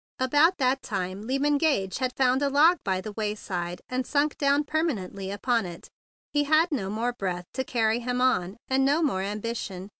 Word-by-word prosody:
About 295 +8 +3
that 265 0 +1
time 195 +1 -4
Lyman 285 +2 +1
Gage 235 - +1
had 255 -1 -2
found 260 0 +3
a 285 - +2
log 310 +5 +5
by 185 -1 -1
the 215 - -6
wayside, 200 -5 -4
and 255 0 -2
sunk 290 +2 0
down 280 +1 +3
permanently 230 - -2
upon 225 +1 0
it. 170 -1 -10 0.4
He 290 0 +2
had 315 +4 +3
no 210 -10 -2
more 230 +4 -1
breath 180 -5 -3
to 260 - -1
carry 225 -2 +1
him 250 +1 -2
on, 225 -6 +1
and 265 0 +2
no 290 +5 +3
more 220 -11 0
ambition. 205 -2 -4
250 Hz, 185 wpm, -26 LUFS, 200-285 Hz, 0.4 s, log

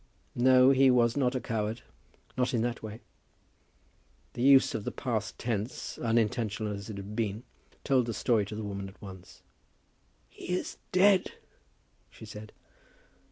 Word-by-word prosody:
"No; 130 +1 +5
he 135 0 +5
was 120 -2 +3
not 130 -2 +1
a - - 0
coward; 110 -1 -3 0.5
not 125 0 0
in 115 - +1
that 120 0 -2
way." 110 +1 -8 1.3
The - - -5
use 135 +1 +6
of 105 - -3
the - - -3
past 110 -5 -3
tense, 115 0 -4
unintentional 110 -2 0
as 100 +2 -7
it 105 - -6
had 100 +2 -7
been, 110 0 -2 0.4
told 130 -3 +2
the 115 - -2
story 110 -5 +1
to 105 - -6
the 110 - -5
woman 100 -1 -5
at 95 - -18
once. 95 -2 -12 0.8
"He - - -11
is - - -6
dead," 190 +1 +4 0.8
she - - -13
said. 105 0 -10
115 Hz, 155 wpm, -29 LUFS, 105-125 Hz, 1.3 s, use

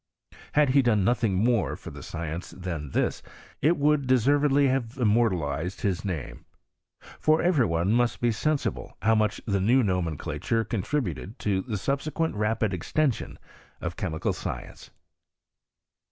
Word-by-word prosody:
Had 150 -2 +4
he 135 +2 +5
done 110 -6 +2
nothing 110 -2 +2
more^ 120 -4 +1
for - - -9
the - - -10
science 85 +1 -5
than 85 -6 -5
this, - - 0 0.4
it 165 +4 +3
would 145 -2 +2
deservedly 140 +3 +4
have 130 -1 -1
immortalized 95 - +1
his 95 -4 -1
name. 80 - -5 0.8
For 155 +1 +3
every 160 -8 +3
one 85 +4 +1
must 120 +1 +2
be 120 -1 +2
sensible 150 +6 -2
how 110 +1 +4
much 110 -2 +1
the 100 -3 0
new 120 +6 +4
nomenclature 90 +4 -1
contri 120 +8 -1
buted 90 - -6
to 100 -2 0
the 110 0 -4
subsequent 150 - -1
rapid 105 -1 0
extension 130 - -1 0.4
of 85 +1 -4
chemical 80 -5 -2
science. - - -7
110 Hz, 140 wpm, -27 LUFS, 95-135 Hz, 0.8 s, he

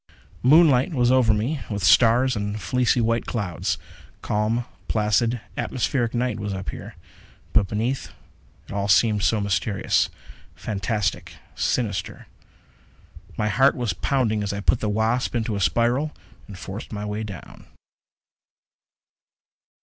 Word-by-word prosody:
Moonlight 145 0 +5
was 120 -1 +3
over 130 -4 +4
me, 115 +8 -1
with 105 -3 -3
stars 120 +8 +5
and 105 0 -3
fleecy 125 +1 +1
white 115 0 0
clouds. 100 -8 -2 0.5
Calm, 110 +3 0 0.2
placid, 115 +3 +1 0.2
atmospheric 120 -1 -1
night 125 -1 -1
was 100 -1 -3
up 95 0 -5
here. - - -9 0.6
But 105 -3 +4
beneath, 115 +6 -2 0.6
it - - -8
all 100 0 -1
seemed 105 +1 +3
so 110 +2 +2
mysterious, 100 0 0 0.5
fantastic, 105 0 -2 0.2
sinister. 100 -7 -2 1.1
My 105 0 0
heart 135 +4 +4
was 120 -8 -1
pounding 110 - 0
as 100 -1 -2
I 100 - -3
put 110 +4 +2
the 105 - -1
Wasp 110 +4 0
into 115 -2 -1
a - - -2
spiral 120 +9 +1 0.3
and 100 - -10
forced 100 +3 -8
my 105 -1 -4
way 105 +1 -3
down. 100 -6 -9
110 Hz, 130 wpm, -23 LUFS, 105-125 Hz, 1.1 s, Moonlight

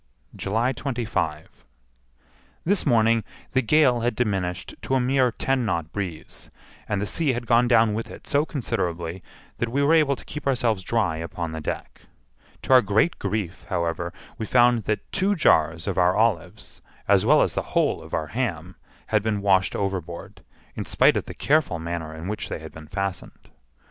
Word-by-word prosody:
July 115 +6 0
25. 115 - -3 1.0
This 190 -1 +1
morning 115 -2 +4 0.3
the 130 - +2
gale 130 -1 +4
had 120 +1 0
diminished 95 -7 -2
to 135 - -1
a - - +3
mere 130 0 +2
ten 135 +2 0
knot 85 -7 -2
breeze, 90 -6 -6 0.4
and 105 - 0
the 100 - -1
sea 145 +5 0
had 120 0 -4
gone 120 +1 +4
down 115 -3 +4
with 115 +2 -4
it - - -11
so 145 +1 +2
considerably 90 - -3 0.4
that 120 - -1
we 140 +4 +1
were 150 +3 +4
able 150 -4 +4
to - - -14
keep 150 -1 -6
ourselves 120 -6 +1
dry 100 -5 0
upon 85 0 -5
the 80 0 -5
deck. - - -5 0.6
To - - +2
our 130 - +9
great 110 - +1
grief, 100 -3 -3
however, 85 0 -1 0.3
we 110 - -3
found 120 -2 +4
that 105 - -2
two 195 +1 +1
jars 80 - +3
of - - 0
our 90 0 +4
olives, 105 -3 -1 0.3
as - - +4
well - - +5
as - - -1
the - - -1 0.2
whole - - +2
of - - -12
our 80 - -1
ham, 95 - -3 0.3
had 110 -1 +3
been 110 -1 -1
washed 95 -2 +3
overboard, 95 -1 -4 0.3
in - - -4
spite - - +4
of - - -1
the - - -8
careful 150 - +2
manner 80 -1 -4
in 80 +3 -7
which 105 +1 -4
they - - -3
had 80 0 -10
been 80 -1 -12
fastened. 95 +1 -5
105 Hz, 180 wpm, -24 LUFS, 85-125 Hz, 1.0 s, our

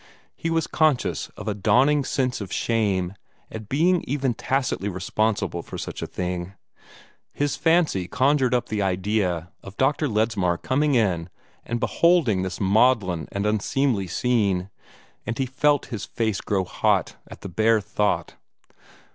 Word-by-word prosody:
He 165 - -3
was 165 0 +1
conscious 155 -5 +1
of - - -8
a 105 - 0
dawning 135 +8 +3
sense 130 -3 -1
of 95 -3 -6
shame 100 -6 0 0.4
at 110 -1 -8
being 170 +5 +2
even 135 -2 0
tacitly 130 -6 -1
responsible 95 0 -1
for - - -8
such - - -6
a - - -3
thing. 90 +1 -4 0.8
His 145 -1 -1
fancy 160 - +2
conjured 130 +1 +2
up 120 0 -1
the 105 -2 -1
idea 95 -2 -1
of 100 0 -12
Dr. 145 +3 +2
Ledsmar 105 -6 +1
coming 145 - +1
in 90 -7 +1 0.3
and 120 0 -3
beholding 165 - +3
this 95 0 -4
maudlin 100 - +2
and 100 +1 -2
unseemly 110 0 0
scene, 100 -2 0 0.6
and 115 - -2
he 135 - 0
felt 145 +3 +1
his 105 - -4
face 110 -4 -2
grow 95 -2 0
hot - - 0
at - - -11
the - - -6
bare 110 +4 +2
thought. 105 +1 -1
110 Hz, 145 wpm, -24 LUFS, 95-135 Hz, 0.8 s, dawning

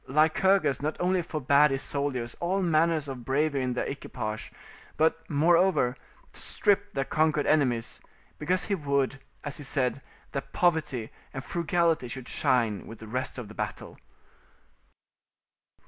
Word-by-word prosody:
Lycurgus 155 +1 +3
not 155 +2 -2
only 180 0 +2
forbad 150 -2 +3
his 135 0 -1
soldiers 130 -5 -2
all 185 +3 0
manner 165 0 +3
of 135 -5 -5
bravery 140 +2 +1
in 125 -1 -1
their 125 - -1
equipage, 110 -5 -5 0.5
but, 160 +1 +2
moreover, 160 -3 +3 0.4
to - - -9
strip 205 -2 +1
their 135 -1 0
conquered 155 -1 +1
enemies, 125 -7 +1 0.4
because 180 +5 +1
he 205 - -1
would, 140 -5 0 0.2
as 140 -3 -3
he 145 - -6
said, 135 -1 0 0.3
that 140 - -5
poverty 155 -10 +1 0.2
and 135 - -4
frugality 170 -4 +1
should 125 +1 -7
shine 115 -5 +1
with 115 - -9
the 110 - -11
rest 125 +4 -3
of 120 -4 -6
the 105 - -11
battle. - - -5
145 Hz, 145 wpm, -28 LUFS, 130-165 Hz, 0.5 s, Lycurgus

